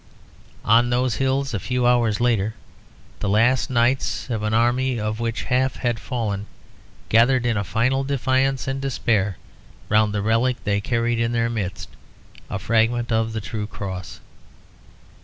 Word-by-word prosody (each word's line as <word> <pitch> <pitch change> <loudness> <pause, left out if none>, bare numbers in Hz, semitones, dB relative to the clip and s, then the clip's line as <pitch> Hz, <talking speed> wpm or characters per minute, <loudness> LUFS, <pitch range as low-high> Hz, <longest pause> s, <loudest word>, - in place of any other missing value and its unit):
On 120 +3 +4
those 120 -2 +1
hills, 135 +1 0
a 105 - -1
few 125 +5 -1
hours 120 -4 +3
later, 110 -3 +1 0.6
the 105 - -2
last 120 +7 +3
knights 125 +1 0
of 110 -2 -1
an 110 0 -1
army 120 +2 +1
of 105 +1 -3
which 115 0 -2
half 130 +1 +1
had 120 -3 -1
fallen 105 -5 -3 0.6
gathered 120 +2 +4
in 120 -2 +1
a 100 - 0
final 120 +8 0
defiance 135 -1 0
and 135 0 -2
despair 105 -8 0 0.5
round 105 0 +3
the 105 -1 -2
relic 115 +3 +2
they 100 -1 0
carried 115 +1 0
in 115 +1 0
their 115 0 +1
midst, 100 -4 -4 0.6
a - - -3
fragment 115 +1 +1
of 110 0 +1
the 110 0 -4
True 105 0 -4
Cross. 95 -3 -7
115 Hz, 155 wpm, -22 LUFS, 110-125 Hz, 0.6 s, On